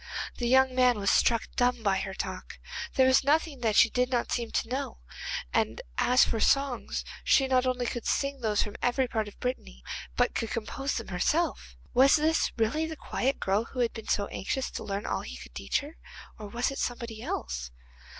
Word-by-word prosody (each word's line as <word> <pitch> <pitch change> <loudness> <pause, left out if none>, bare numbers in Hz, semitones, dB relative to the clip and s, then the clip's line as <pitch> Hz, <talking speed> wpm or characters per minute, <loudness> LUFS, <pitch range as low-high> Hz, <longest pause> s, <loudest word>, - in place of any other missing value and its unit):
The 240 - 0
young 260 +1 +5
man 250 -2 +4
was 200 -1 +2
struck 230 -1 +3
dumb 245 -1 +1
by 195 -2 +2
her 195 0 -4
talk. 185 -1 -5 0.4
There 260 - +5
was 260 +1 +5
nothing 295 0 +1
that 225 -3 +1
she 230 - +7
did 250 0 +1
not 245 -2 -1
seem 235 -2 -1
to - - -1
know, 260 +4 -3 0.6
and - - +1 0.2
as 250 +1 +5
for 225 - -1
songs 275 +1 +1 0.2
she 270 - +4
not 260 -1 +2
only 250 -1 0
could 240 -1 -3
sing 275 0 0
those 215 -2 +2
from 205 - -7
every 250 +1 +2
part 220 -3 -2
of 205 - -12
Brittany, 65 - -4 0.3
but - - +2
could 225 - -2
compose 270 +5 -3
them 230 - -4
herself. 300 - 0 0.2
Was 270 +3 +6
this 315 +1 +2
really 270 +9 +1
the 320 - -5
quiet 270 0 -1
girl 200 +4 +1
who 255 - -8
had 235 - +1
been 225 - -8
so 200 - +1
anxious 260 +7 -3
to - - -5
learn 200 0 -3
all - - -1
he - - -8
could - - -12
teach - - -1
her, 295 +3 -11 0.4
or 210 - -7
was 235 +6 -1
it 275 - -6
somebody 235 -3 -3
else? - - -4
245 Hz, 205 wpm, -29 LUFS, 215-265 Hz, 0.6 s, she